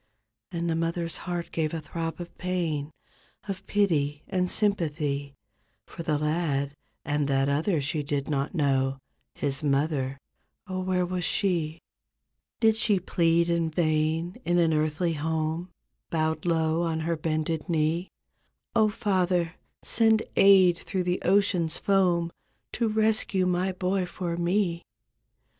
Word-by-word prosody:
And 170 -1 -2
the 165 - +1
mother's 165 0 -2
heart 175 -1 -4
gave 160 0 -1
a - - -2
throb 165 +2 -5
of 175 -1 -8
pain. 170 -5 -1 0.6
Of 195 -1 -5
pity 150 -8 +1
and 180 -1 0
sympathy 150 -9 0 0.5
For - - -9
the 155 -3 0
lad, 150 -2 0 0.3
and 145 -1 0
that 135 -1 +2
other 155 +3 +1
she 150 +2 0
did 140 -1 -2
not 140 +2 -1
know. 135 -3 +1 0.4
His 140 0 -2
mother—oh, 140 +6 -3
where 185 -1 0
was 180 0 -3
she? 165 -4 0 0.8
Did 220 -1 +4
she 210 -3 +2
plead 170 -1 +2
in 170 -1 +1
vain 160 +1 0
in 175 +2 +1
an 165 -2 +3
earthly 155 +3 0
home 160 +3 -2 0.4
Bowed 160 0 -1
low 160 -1 +2
on 165 -2 -1
her 165 +1 0
bended 155 +1 -2
knee, 165 +2 +1 0.7
''0, 215 -1 +4
Father, 185 -5 +1 0.3
send 225 -1 +3
aid 185 -3 +6
through 190 -3 -2
the 180 +1 -1
ocean's 185 -4 +2
foam 180 -4 +2 0.4
To 235 - 0
rescue 215 -3 +2
my 180 +1 +1
boy 185 0 -1
for 175 -1 -4
me?" 175 0 0
170 Hz, 135 wpm, -27 LUFS, 155-185 Hz, 0.8 s, aid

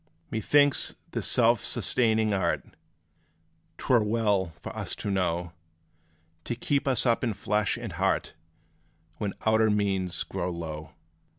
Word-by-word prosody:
Methinks 145 +6 +3 0.2
this - - -2
self 115 -2 +4
sustaining 110 -3 +1
art 95 - 0 1.1
'T - - -9
were 120 -4 +5
well 105 -5 +1
for - - -8
us - - -2
to 100 - -4
know, 90 -2 -1 0.9
To 120 - -2
keep 140 +3 -1
us 130 -3 +2
up 120 0 +2
in 115 -3 0
flesh 105 +1 0
and - - -6
heart, - - 0 0.9
When 100 -2 -3
outer 110 0 +4
means 95 -4 0
grow 90 -2 -3
low. 80 -3 -6
105 Hz, 130 wpm, -27 LUFS, 95-115 Hz, 1.1 s, were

